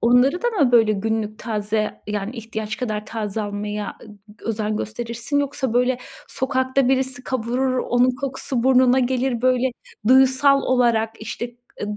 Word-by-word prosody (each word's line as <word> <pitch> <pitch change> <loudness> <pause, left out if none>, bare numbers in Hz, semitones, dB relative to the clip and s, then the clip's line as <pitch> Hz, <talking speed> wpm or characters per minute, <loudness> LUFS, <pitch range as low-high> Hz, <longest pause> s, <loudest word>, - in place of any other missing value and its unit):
onları 245 +8 +3
da 485 - +2
mı 290 - +2
böyle 225 -3 +5
günlük 215 +1 -2
taze, 215 -1 -2
yani, 210 +3 -4
ihtiyaç 220 -1 -5
kadar 215 -4 -3
taze 215 -1 -3
almaya 205 0 -4
ı - - -12 0.2
gı 210 +2 -18
özen 215 -1 -1
gösterirsin? 235 +5 -3
Yoksa, 280 -3 -1
böyle, 250 +1 +2 0.3
sokakta 260 0 0
birisi 260 -1 +1
kavurur 255 +1 -1
onun 245 +1 +2
kokusu 265 -2 -2
burnuna 255 0 +5
gelir 255 -1 0
böyle 255 0 +2 0.4
duyusal 265 +2 +5
olarak, 235 -3 +2
işte, 235 +2 -5 0.3
ııı, 210 0 -3
245 Hz, 145 wpm, -22 LUFS, 220-260 Hz, 0.4 s, böyle